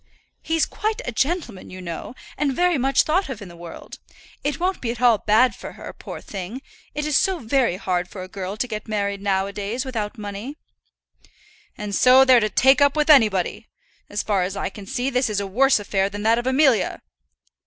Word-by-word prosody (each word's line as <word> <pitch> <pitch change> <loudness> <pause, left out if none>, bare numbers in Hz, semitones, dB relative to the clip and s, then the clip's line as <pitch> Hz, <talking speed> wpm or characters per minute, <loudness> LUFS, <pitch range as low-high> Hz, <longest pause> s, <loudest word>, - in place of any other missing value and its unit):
"He's 325 -1 +1
quite 435 0 -3
a - - -3
gentleman, 265 - -2
you 185 - -9
know, 170 +6 -7 0.2
and 275 -2 -1
very 355 -2 +2
much 270 +1 +3
thought 355 +2 0
of 255 -5 -5
in 200 -4 -10
the 170 - -13
world. 170 -1 -10 0.4
It 285 0 -2
won't 370 +2 -1
be 235 - -2
at 235 -1 -4
all 240 -4 +4
bad 220 +4 +3
for - - -9
her, - - -9
poor - - -9
thing. 200 +7 -7 0.3
It 300 0 -2
is 300 -2 0
so 380 +3 +2
very 245 - +1
hard 180 -2 -1
for 185 - -8
a - - -8
girl 190 +1 -6
to 250 - -1
get 215 -3 -6
married 200 -2 -2
now 195 -1 +1
a 200 - -7
days 215 +6 -3
without 230 -3 -4
money." 210 +7 -7 1.2
"And 210 -1 -5
so 255 +5 +6
they're 255 -2 +7
to 215 -1 0
take 265 +5 +4
up 285 0 +4
with 305 0 +4
anybody. 215 - +3 0.4
As 205 - -2
far 200 -3 +1
as 185 +2 -3
I - - -2
can 200 -2 -11
see, 255 +5 -2
this 250 -2 +1
is 210 -1 -1
a 200 - -3
worse 265 +6 +3
affair 195 -1 0
than 205 +1 -6
that 225 +2 +3
of 240 - -4
Amelia." 265 -3 +2
230 Hz, 215 wpm, -22 LUFS, 200-270 Hz, 1.2 s, they're